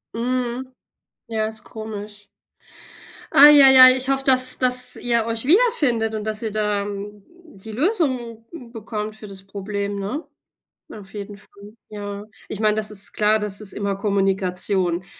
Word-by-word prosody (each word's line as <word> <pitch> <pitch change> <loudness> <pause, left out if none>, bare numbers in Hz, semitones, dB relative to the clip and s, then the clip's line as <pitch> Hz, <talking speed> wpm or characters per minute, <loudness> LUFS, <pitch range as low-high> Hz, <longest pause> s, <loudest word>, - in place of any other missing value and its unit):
Mhm. 250 +2 -3 0.5
Ja, 220 -1 -2
ist 220 0 -9
komisch. 210 -1 -9 1.1
Ei 290 0 +8
ei 265 -1 +7
ei, 255 0 +9
ich 260 +1 -2
hoffe, 270 0 0
dass 255 -1 +5
dass 250 0 +2
ihr 235 -2 -1
euch 230 +1 -1
wiederfindet 285 - +2
und 215 - -5
dass 215 -1 -3
ihr 220 -2 -4
da, 210 -1 -1
hm, 205 0 -8 0.3
die 200 +3 -11
Lösung, 255 - -2
hm, 250 -9 -12
bekommt 215 -1 -6
für 215 -1 -11
das 195 -1 -10
Problem, 200 +1 -5
ne? 205 +11 -5 0.7
Auf 200 -2 -13
jeden 205 0 -8
Fall, 205 +1 -17
ja. 205 -1 -8 0.2
Ich 215 - -6
meine, 215 -1 +2
das 215 -1 -1
ist 200 -2 +1
klar, 215 +1 +2
das 210 -1 0
ist 205 -2 0
immer 200 -1 -3
Kommunikation. 190 -2 -1
215 Hz, 160 wpm, -21 LUFS, 205-250 Hz, 1.1 s, ei